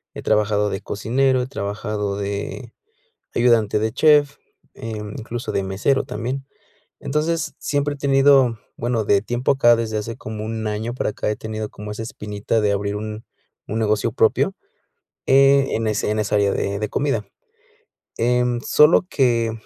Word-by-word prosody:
he - - -6
trabajado 105 -1 +2
de 95 +1 -4
cocinero, 130 +6 +1
he 125 - -3
trabajado 105 -2 -3
de 100 +4 -5 0.6
ayudante 115 -4 +3
de 110 +1 -1
chef, 145 0 +4 0.4
eh, 110 -1 -6 0.2
incluso 120 0 -5
de 100 - 0
mesero 100 +8 0
también, 125 +6 -4 0.6
entonces, 155 +3 -1
siempre 145 0 -1
he - - -15
tenido, 135 -4 +4 0.2
bueno, 120 -2 -1
de 100 -1 +3
tiempo 120 +5 0
acá 120 -3 +5
desde 110 -1 -3
hace 115 +3 -5
como 110 -6 -6
un 110 -1 -3
año 110 +3 -3
para 125 - -2
acá - - -3
he 105 - -4
tenido 110 -1 -5
como 105 0 -8
esa 105 +2 -5
espinita 105 0 -3
de 105 -1 +2
abrir 100 +1 -2
un 110 +1 -6 0.5
un 110 - -1
negocio 105 -2 +1
propio, - - +2 0.7
eh, 135 0 +5
en 115 0 -2
ese 105 -1 0
en 110 - -1
esa 105 0 0
área 100 -1 +2
de 100 0 -2
de 105 - -2
comida, 125 -7 -1 0.9
em, 125 +1 +1
solo 150 +8 +5
que 120 -4 +2
115 Hz, 160 wpm, -21 LUFS, 105-130 Hz, 0.9 s, acá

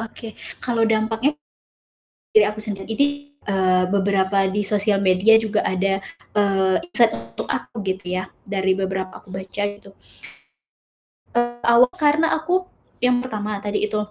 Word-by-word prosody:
Oke. 225 0 -8 0.2
Kalau 230 -2 +1
dampaknya 225 +6 +1 1.0
dari 215 -1 +7
aku 210 +1 -7
sendiri. 205 -3 -4
Jadi, 280 +5 +4 0.4
eee, 185 -2 +2
beberapa 195 0 +2
di 205 +2 -1
sosial 205 0 +2
media 195 +4 +5
juga 220 -1 0
ada, 195 +1 0 0.4
eee, 195 -2 +3 0.2
insight 235 -7 +4
untuk 115 0 -7
aku - - -3
gitu 190 0 -3
ya, 185 - -2 0.2
dari 190 -1 +1
beberapa 190 -1 -3
aku 195 - -20
baca 190 +2 -4
gitu. 200 -1 -16 1.4
Eee, 240 0 0
aw 235 +1 +7
karena 315 -1 +2
aku, 355 +4 0 0.4
yang 250 0 +3
pertama 215 -4 -3
tadi 205 +1 -1
itu, 210 - -3
205 Hz, 140 wpm, -22 LUFS, 190-225 Hz, 1.4 s, dari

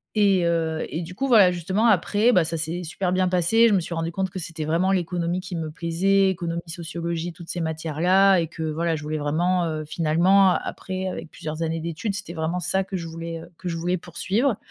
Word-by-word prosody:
Et 200 -4 +4
heu, 165 -2 0
et 165 - -3
du 180 +2 -8
coup, 270 +7 -1
voilà 210 -8 +6
justement 185 +6 0
après, 210 +3 +3
bah, 180 - +5
ça 165 +1 -3
s'est 165 +2 -3
super 180 +2 -2
bien 185 0 +2
passé, 185 +6 +4
je 220 - +3
me 195 - +4
suis 170 0 -5
rendu 165 0 -2
compte 190 +2 -2
que 185 - -8
c'était 165 -2 -5
vraiment 165 +5 +1
l'économie 175 -1 -1
qui 185 0 -7
me 160 -2 -4
plaisait, 185 +4 +2
économie, 170 -2 -3
sociologie, 170 0 -4
toutes 170 -1 -12
ces 175 - -3
matières-là 165 +5 +3
et 165 - -1
que 165 +1 -10
voilà, 160 +1 -1
je 150 - -6
voulais 155 +1 -3
vraiment, 170 +5 +1
heu, 155 -1 -3
finalement 175 +5 +4
après, 185 +1 -3
avec 180 -3 -6
plusieurs 155 +1 -5
années 165 0 -1
d'études 170 +6 -3
c'était 180 -4 -6
vraiment 165 +2 -2
ça 190 +2 +1
que 190 0 -7
je 170 -2 -4
voulais, 165 0 -6
heu, 165 - -12
que 185 - -7
je 170 - -2
voulais 175 +2 -1
poursuivre. 200 - -1
170 Hz, 225 wpm, -24 LUFS, 165-185 Hz, -, voilà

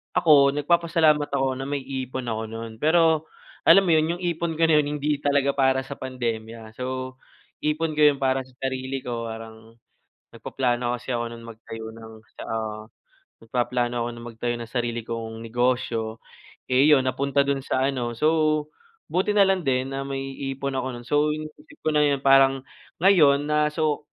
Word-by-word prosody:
ako 140 -4 +5
nagpapasalamat 155 -1 +2
ako 135 -1 0
na - - -3
may 140 -1 -3
ipon 130 -1 -5
ako 110 -1 -3
nun. 115 0 -8
Pero 160 +1 +3 0.4
alam 195 - +8
mo 180 - +1
'yon, 160 +1 +3
yung 175 - -11
ipon 170 -1 -1
ko 165 - 0
na 160 -2 +5
'yon, 145 - 0
hindi 150 0 -1
talaga 140 -1 +2
para 130 -1 +2
sa 140 +1 -9
pandemya. 115 -3 -5
So, 130 0 -4 0.4
ipon 155 0 -1
ko - - +4
yun 145 - +4
para 130 -1 -1
sa 130 - -22
sarili 130 0 -3
ko, 115 -1 -4
parang 110 0 -10 0.6
nagpaplano 120 -1 -2
kasi 125 +1 -7
ako 120 -1 -1
nun 115 - -11
magtayo 115 0 -9
ng 110 0 -12
tsa - - -12
ah, 110 -1 -4 0.6
nagpaplano 120 +1 -1
ako - - -2
nung 120 0 -9
magtayo 120 +1 -2
ng 115 - -6
sarili 120 -1 -2
kong 115 -1 -5
negosyo, 115 -1 -1 0.5
eh, 130 +1 +3
'yon 135 -3 +4
napunta 140 +2 0
dun 140 -1 -1
sa 130 -1 0
ano, 125 -4 -2
so 155 +3 +1 0.4
buti 185 +4 0
na 200 - +7
lang 190 -1 +1
din 135 0 -1
na 135 - -3
may 135 0 -5 0.2
ipon 135 0 -4
ako 130 0 -2
nun. 120 -1 -9
So, 150 +2 +2
iniisip 155 - -9
ko 155 - +2
na 150 - +5
yun 140 -2 +2
parang 135 0 +5 0.4
ngayon, 150 -6 +5
na 150 0 +2
so 155 -1 -1
135 Hz, 180 wpm, -24 LUFS, 120-150 Hz, 0.6 s, alam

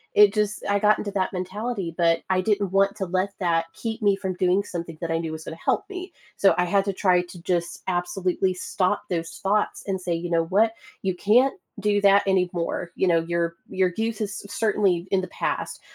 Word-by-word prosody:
it 205 -1 +8
just 210 -1 -1
I 200 - +3
got 210 +1 +3
into 205 - -3
that 190 -1 -1
mentality, 190 0 -3
but 165 -1 +3
I 185 - +2
didn't 200 -2 0
want 195 +1 +3
to 190 - -2
let 185 +2 -1
that 165 -2 +1
keep 225 0 -4
me 200 -1 +4
from 190 -2 -4
doing 185 +1 +2
something 170 -4 -6
that 170 - -3
I 165 - +1
knew 165 -1 -3
was 160 0 -6
gonna 165 - -7
help - - 0
me. 370 -2 -7 0.2
So, 195 - +5
I 180 - +3
had 195 +3 +2
to 200 - -1
try 180 -2 +3
to 175 -1 -12
just 175 -1 -2
absolutely 185 +1 0
stop 185 +2 -1
those 165 -2 -3
thoughts 205 +2 0
and 190 -1 -1
say, 180 -1 -2
"You 170 +1 -3
know 165 -1 +2
what? 215 +6 +3 0.3
You 190 -2 -1
can't 240 - +3 0.2
do 205 0 +2
that 200 0 +6
anymore." 180 -2 0
You 190 - +1
know, 165 -1 +4
"Your 170 0 -1
your 185 -1 +1
youth 225 -1 -1
is 200 -1 -2
c 200 - -8
certainly 195 -6 +1
in 195 -1 +2
the 185 - -5
past, - - -2
190 Hz, 220 wpm, -24 LUFS, 175-205 Hz, 0.3 s, it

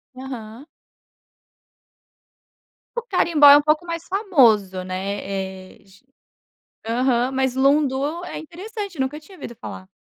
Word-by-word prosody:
Aham. 255 -1 -9 2.3
O 480 - -1
Carimbó 335 -9 +4
é 285 - +10
um 295 - +3
pouco 305 +3 +1
mais 335 -1 -5
famoso, 235 - +2
né. 190 +2 -4 0.6
Eh, - - -24
j 195 +4 -22 0.9
Aham, 245 +1 +1
mas 265 -1 0
Lundu 280 +4 +1
é - - -6
interessante, 390 - -8
nunca 270 +3 -2
tinha 370 +5 -16
ouvido 240 -6 -8
falar. 185 -4 -9
275 Hz, 120 wpm, -22 LUFS, 235-335 Hz, 2.3 s, é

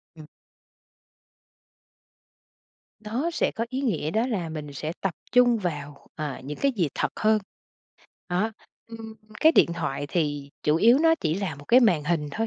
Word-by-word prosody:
Ừm. 155 -2 -12 2.8
Nó 245 +10 -1
sẽ 340 - 0
có 230 - -3
ý 260 - -2
nghĩa 175 - -1
đó 220 +6 +1
là 195 -10 -2
mình 150 -2 -6
sẽ 155 +3 -4
tập 195 -4 -1 0.2
trung 245 -2 +5
vào, 150 -7 -5
ờ, 150 -3 -5
những 145 +2 -6
cái 275 -1 +3
gì 180 -9 0
thật - - 0
hơn. 215 0 +4 0.9
Đó, 185 +5 0 0.3
ừm, 225 -1 -9 0.3
cái 320 - +6
điện 170 - +4
thoại 145 -4 -3
thì 145 -3 -2
chủ 150 +1 +3
yếu 235 - +6
nó 325 +1 +5
chỉ 160 -1 0
là 190 -5 -3
một 145 +1 -13
cái 250 +2 +7
màn 180 - +3
hình 150 -2 0
thôi. 225 +8 -2
180 Hz, 170 wpm, -26 LUFS, 150-230 Hz, 2.8 s, cái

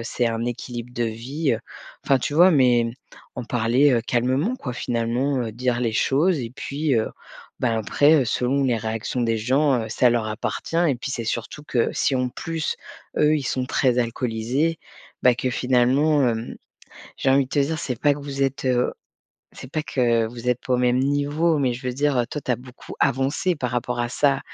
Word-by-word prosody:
c'est 120 +1 -1
un 115 0 -2
équilibre 120 0 -5
de 120 -1 0
vie, 125 +6 -2
heu, 110 - -1 0.5
enfin, 135 -1 +3
tu 135 - -3
vois? 175 +4 +7
Mais 125 -6 +3 0.5
en 125 - -4
parler, 120 +5 +3
heu, 120 - +3
calmement 130 - +1
quoi 125 - -5
finalement, 125 +3 -1
heu, 110 -2 -4
dire 125 +1 -1
les 115 -2 0
choses 150 +9 +2
et 115 - -5
puis, 145 0 -1
heu, 110 - 0 0.5
ben, 115 -3 +1
après, 145 +8 +3
heu, - - -2
selon 135 +4 0
les 120 -3 +2
réactions 110 +3 -3
des 115 -1 +1
gens, 130 +3 +2
heu, - - -7
ça 125 - +3
leur 115 -2 0
appartient. 110 +8 -4
Et 140 - +2
puis 135 - -5
c'est 115 - -3
surtout 120 +6 -4
que 120 -5 0
si, 135 - +1
en 125 0 0
plus, 165 +4 -3 0.4
eux 150 +1 +4
ils 145 - -3
sont 130 0 -1
très 125 -2 +1
alcoolisés, 125 +6 -1 0.4
bah, 125 -1 +5
que 125 +1 -2
finalement, 130 +4 +2
hem, 115 0 -3 0.6
j'ai 135 - +1
envie 135 0 +4
de - - -18
te - - -3
dire 155 +3 0
c'est 125 -3 -4
pas 145 - +4
que 145 - -8
vous 140 -1 -3
êtes 135 0 -2
heu, 125 -1 +1 0.6
c'est 130 - -10
pas 155 - -2
que 120 -6 +1
vous 120 +1 -6
êtes 125 -1 +1
pas 130 - 0
au - - +3
même 125 0 +2
niveau, 145 +4 +1
mais 130 -3 +1
je 130 +1 -7
veux 125 - -1
dire, 145 0 +1
heu, 120 - +1
toi 150 - -4
tu - - -4
as - - 0
beaucoup 125 0 -12
avancé 140 +8 +1
par 125 -3 -3
rapport 120 0 -2
à 120 - -1
ça, 140 +1 +1
125 Hz, 210 wpm, -23 LUFS, 120-140 Hz, 0.6 s, vois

